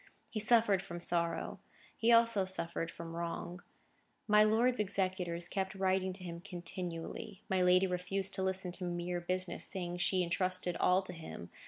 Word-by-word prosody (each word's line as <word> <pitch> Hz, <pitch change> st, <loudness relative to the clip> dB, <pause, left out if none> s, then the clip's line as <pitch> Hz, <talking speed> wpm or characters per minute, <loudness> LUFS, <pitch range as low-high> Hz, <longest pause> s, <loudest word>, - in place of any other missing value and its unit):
He 215 Hz, -, -2 dB
suffered 215 Hz, -3 st, +4 dB
from 175 Hz, -3 st, -7 dB
sorrow. 170 Hz, -1 st, 0 dB, 0.4 s
He 230 Hz, +1 st, +2 dB
also 230 Hz, -3 st, +6 dB
suffered 170 Hz, -3 st, -1 dB
from 165 Hz, 0 st, -8 dB
wrong. 170 Hz, +1 st, -4 dB, 0.7 s
My 210 Hz, 0 st, +6 dB
lord's 230 Hz, +3 st, +3 dB
executors 185 Hz, -4 st, 0 dB
kept 190 Hz, +1 st, -3 dB
writing 190 Hz, 0 st, +1 dB
to 185 Hz, 0 st, -10 dB
him 170 Hz, -1 st, -6 dB
continually. 175 Hz, 0 st, -6 dB
My 190 Hz, -1 st, +2 dB
lady 180 Hz, +1 st, +5 dB
refused 190 Hz, +2 st, -1 dB
to -, -, -1 dB
listen 190 Hz, -1 st, +1 dB
to 185 Hz, -, -6 dB
mere 175 Hz, 0 st, -2 dB
business, 185 Hz, 0 st, -1 dB
saying 175 Hz, -2 st, -3 dB
she 185 Hz, +1 st, +1 dB
intrusted 180 Hz, 0 st, 0 dB
all 185 Hz, +1 st, +3 dB
to 185 Hz, -, -6 dB
him. 160 Hz, -, -9 dB
185 Hz, 160 wpm, -34 LUFS, 175-195 Hz, 0.7 s, also